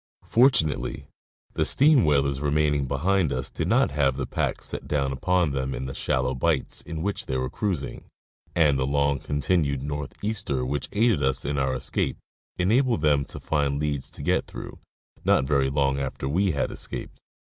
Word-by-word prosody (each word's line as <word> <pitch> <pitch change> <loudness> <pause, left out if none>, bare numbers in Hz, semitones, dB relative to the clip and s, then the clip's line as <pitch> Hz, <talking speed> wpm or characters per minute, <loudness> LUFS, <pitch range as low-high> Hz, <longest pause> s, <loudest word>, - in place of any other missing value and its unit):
Fortunately, 115 - +2 0.5
the - - +1
steam 145 -3 +5
whalers 70 -2 +2
remaining 75 -1 +1
behind 80 +4 +1
us 65 0 -2
did - - -2
not - - +3
have 70 -2 +1
the 65 - -2
pack - - -2
set - - -5
down 70 -2 0
upon 85 +4 +1
them 65 -1 -2
in 65 - -4
the 65 - -5
shallow - - 0
bights 70 +2 0
in 80 -1 -6
which 100 +1 -2
they 65 - -1
were 65 +1 -2
cruising, 90 -10 -3 0.5
and 75 -5 +4
the 65 - 0
long 70 0 +1
continued 70 -1 0
north 75 -1 -4
easter 90 - -1
which 70 +1 -3
aided 110 -5 +2
us 65 -1 0
in 70 0 -1
our 65 - 0
escape - - -2 0.4
enabled 115 - +2
them 75 -2 +3
to - - -9
find 70 -2 0
leads 75 -3 -2
to - - -9
get - - +1
through, - - -9 0.4
not - - +3
very 70 -1 +2
long 70 -1 +1
after 65 -1 -3
we 95 +8 +1
had 70 -5 -1
escaped. - - -6
70 Hz, 180 wpm, -25 LUFS, 70-85 Hz, 0.5 s, steam